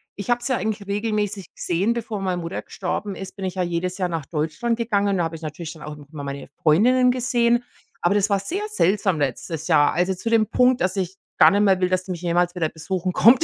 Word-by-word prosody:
ich 200 Hz, +3 st, -7 dB
habe 240 Hz, 0 st, +2 dB
sie 255 Hz, -, 0 dB
ja 235 Hz, -, 0 dB
eigentlich 205 Hz, 0 st, -3 dB
regelmäßig 210 Hz, -2 st, -2 dB
gesehen. 190 Hz, +7 st, 0 dB
Bevor 225 Hz, -3 st, -4 dB
meine 180 Hz, -2 st, -1 dB
Mutter 165 Hz, +2 st, -4 dB
gestorben 195 Hz, +2 st, -4 dB
ist, 190 Hz, -1 st, -8 dB
bin 195 Hz, -2 st, -5 dB
ich 185 Hz, -, -3 dB
ja 185 Hz, -, 0 dB
jedes 175 Hz, +2 st, -2 dB
Jahr 180 Hz, -2 st, -1 dB
nach 165 Hz, -5 st, -4 dB
Deutschland 165 Hz, +10 st, -1 dB
gegangen, 210 Hz, -4 st, +1 dB
und 195 Hz, -, +1 dB
da 175 Hz, -, +1 dB
habe 165 Hz, 0 st, -3 dB
ich 160 Hz, -, -10 dB
natürlich 155 Hz, +1 st, -6 dB
dann 160 Hz, -, -15 dB
auch 150 Hz, 0 st, -7 dB
immer 145 Hz, 0 st, -9 dB
meine 140 Hz, 0 st, -6 dB
Freundinnen 250 Hz, +11 st, +4 dB
gesehen, 240 Hz, -1 st, +2 dB, 0.4 s
aber 175 Hz, -, +3 dB
das 205 Hz, 0 st, +2 dB
war 200 Hz, -, +3 dB
sehr 360 Hz, -, -3 dB
seltsam 195 Hz, -, +2 dB
letztes 150 Hz, +4 st, -3 dB
Jahr, 145 Hz, 0 st, +4 dB
also 180 Hz, +3 st, +1 dB
zu 190 Hz, +5 st, -4 dB
dem 225 Hz, -1 st, +4 dB
Punkt, 250 Hz, 0 st, +3 dB
dass 185 Hz, +2 st, +1 dB
ich 190 Hz, 0 st, -2 dB, 0.2 s
gar -, -, +8 dB
nicht 205 Hz, +1 st, +2 dB
mehr 190 Hz, -2 st, +4 dB
will, 180 Hz, -, +2 dB
dass 185 Hz, 0 st, 0 dB
sie 190 Hz, -, -5 dB
mich 175 Hz, -1 st, -5 dB
jemals 175 Hz, +1 st, +1 dB
wieder 160 Hz, -3 st, 0 dB
besuchen 185 Hz, +3 st, -3 dB
kommt. 235 Hz, +7 st, +6 dB
190 Hz, 245 wpm, -23 LUFS, 170-215 Hz, 0.4 s, gar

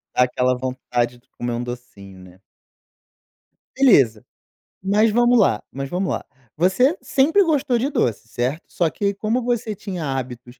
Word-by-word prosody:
Dá 125 Hz, -, +5 dB
aquela 125 Hz, 0 st, +1 dB
vontade 125 Hz, -1 st, -2 dB
de -, -, -37 dB
comer 120 Hz, 0 st, -5 dB
um 120 Hz, -, -3 dB
docinho, 120 Hz, -6 st, -9 dB
né. 90 Hz, 0 st, -16 dB, 1.4 s
Beleza, 135 Hz, -, +4 dB, 0.6 s
mas 210 Hz, +3 st, +3 dB
vamo 240 Hz, +3 st, +3 dB
lá 190 Hz, -, +3 dB
mas 135 Hz, 0 st, -5 dB
vamo 185 Hz, +2 st, -1 dB
lá, -, -, -3 dB, 0.3 s
você 220 Hz, -, +3 dB
sempre 320 Hz, +9 st, +3 dB
gostou 290 Hz, -7 st, +1 dB
de 270 Hz, +5 st, 0 dB
doce, 115 Hz, -, -1 dB
certo? 125 Hz, +8 st, -2 dB
Só 170 Hz, -, +1 dB
que 200 Hz, -1 st, -1 dB
como 220 Hz, +5 st, -1 dB
você 235 Hz, -2 st, -1 dB
tinha 185 Hz, -5 st, -5 dB
hábitos 125 Hz, -2 st, -5 dB
150 Hz, 155 wpm, -21 LUFS, -, 1.4 s, Dá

